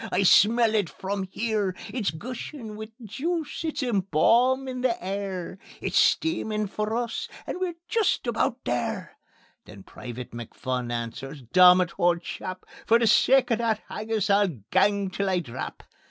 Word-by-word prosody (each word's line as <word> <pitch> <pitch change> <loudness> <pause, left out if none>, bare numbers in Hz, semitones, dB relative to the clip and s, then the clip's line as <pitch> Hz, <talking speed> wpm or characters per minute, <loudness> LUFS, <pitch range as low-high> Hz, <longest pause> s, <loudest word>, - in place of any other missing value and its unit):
I 190 - +2
smell 220 +4 +5
it 205 -6 +1
from 195 0 -4
here. 210 -5 -1 0.2
It's 230 -5 0
gushin' 235 - -7
wi' 220 0 -7
juice, 300 - -3
it's 315 -3 -2
embaumin' 245 - +2
the 250 -2 +1
air; 190 -1 -4 0.2
It's - - +1
steamin' 220 -10 +1
for 210 +2 -3
us, 245 - -3 0.2
and - - -4
we're 365 -2 -2
jist 445 -10 +1
aboot 240 +2 -1
there." 120 -1 -3 0.5
Then 100 -2 -12
Private 125 +3 -8
McPhun 120 +1 -4
answers: 120 +4 -5
"Dommit, 180 +7 +6
auld 175 0 +2
chap! 185 +1 -6 0.2
For 230 - +6
the 235 - +1
sake 255 +3 +4
o' - - +5
that 225 -2 0
haggis 215 -1 -1
I'll 200 0 +4 0.2
gang 200 -2 +2
till 200 +1 -1
I 185 - +2
drap." 130 -6 -7
205 Hz, 150 wpm, -26 LUFS, 180-240 Hz, 0.5 s, Dommit